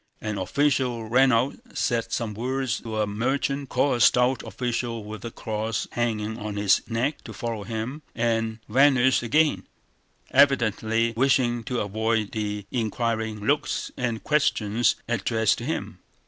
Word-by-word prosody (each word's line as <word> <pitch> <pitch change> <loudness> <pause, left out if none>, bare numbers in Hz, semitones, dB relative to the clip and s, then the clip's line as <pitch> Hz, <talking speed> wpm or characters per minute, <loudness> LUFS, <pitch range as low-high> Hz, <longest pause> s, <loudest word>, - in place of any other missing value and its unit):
An 105 -2 -3
official 130 -6 0
ran 130 +3 +4
out, 120 +4 +1 0.2
said 115 -2 0
some 115 -2 -2
words 130 +2 -2
to 110 -1 -3
a - - +2
merchant, 135 +6 -1
called 130 0 +2
a - - -6
stout 125 +2 +4
official 120 -2 -3
with 105 -1 -8
a 115 - -4
cross 110 0 -3
hanging 110 -2 -2
on 105 -1 -5
his 100 -2 +3
neck 120 +6 -1
to 110 - -8
follow 115 0 -4
him, 115 +7 -4
and 115 -1 0
vanished 130 +1 +4
again, 150 +6 +2 0.6
evidently 115 -4 +3
wishing 120 -2 +2
to 125 0 -1
avoid 110 +1 -1
the 105 -2 -3
inquiring 110 -2 -1
looks 145 +3 0
and 120 -3 -2
questions 120 -6 +2
addressed 110 -3 +1
to - - -6
him. - - -4
115 Hz, 145 wpm, -25 LUFS, 110-130 Hz, 0.6 s, ran